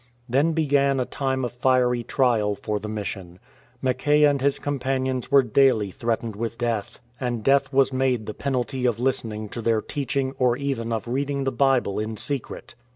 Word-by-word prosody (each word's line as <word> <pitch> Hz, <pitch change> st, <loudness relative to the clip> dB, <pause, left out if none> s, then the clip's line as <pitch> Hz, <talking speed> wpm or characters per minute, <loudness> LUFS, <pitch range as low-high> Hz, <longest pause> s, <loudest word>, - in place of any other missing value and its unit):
Then 140 Hz, +7 st, +2 dB
began 140 Hz, -3 st, +2 dB
a 125 Hz, -, 0 dB
time 130 Hz, -1 st, -2 dB
of 120 Hz, -, -4 dB
fiery 125 Hz, -1 st, +2 dB
trial 115 Hz, -5 st, +1 dB
for 105 Hz, +1 st, -3 dB
the 105 Hz, +1 st, -6 dB
mission. 95 Hz, -4 st, -5 dB, 0.5 s
Mackay 135 Hz, +4 st, +2 dB
and 145 Hz, -2 st, +4 dB
his 140 Hz, 0 st, +2 dB
companions 130 Hz, -2 st, -2 dB
were 140 Hz, -1 st, +6 dB
daily 115 Hz, -4 st, +3 dB
threatened 115 Hz, 0 st, -2 dB
with 115 Hz, +2 st, -4 dB
death, 115 Hz, -4 st, -2 dB, 0.2 s
and 120 Hz, -4 st, -2 dB
death 135 Hz, +2 st, +3 dB
was 135 Hz, -1 st, +3 dB
made 130 Hz, -4 st, +1 dB
the 110 Hz, -, -5 dB
penalty 130 Hz, 0 st, -1 dB
of 115 Hz, -2 st, 0 dB
listening 115 Hz, -4 st, -1 dB
to 120 Hz, -, -5 dB
their 115 Hz, -1 st, +2 dB
teaching 135 Hz, +2 st, -2 dB
or 125 Hz, -1 st, +3 dB
even 130 Hz, -5 st, -2 dB
of 115 Hz, 0 st, -2 dB
reading 140 Hz, +3 st, -1 dB
the 135 Hz, -, 0 dB
Bible 125 Hz, -6 st, +2 dB
in 110 Hz, 0 st, -4 dB
secret. 140 Hz, +4 st, -5 dB
125 Hz, 175 wpm, -24 LUFS, 115-135 Hz, 0.5 s, were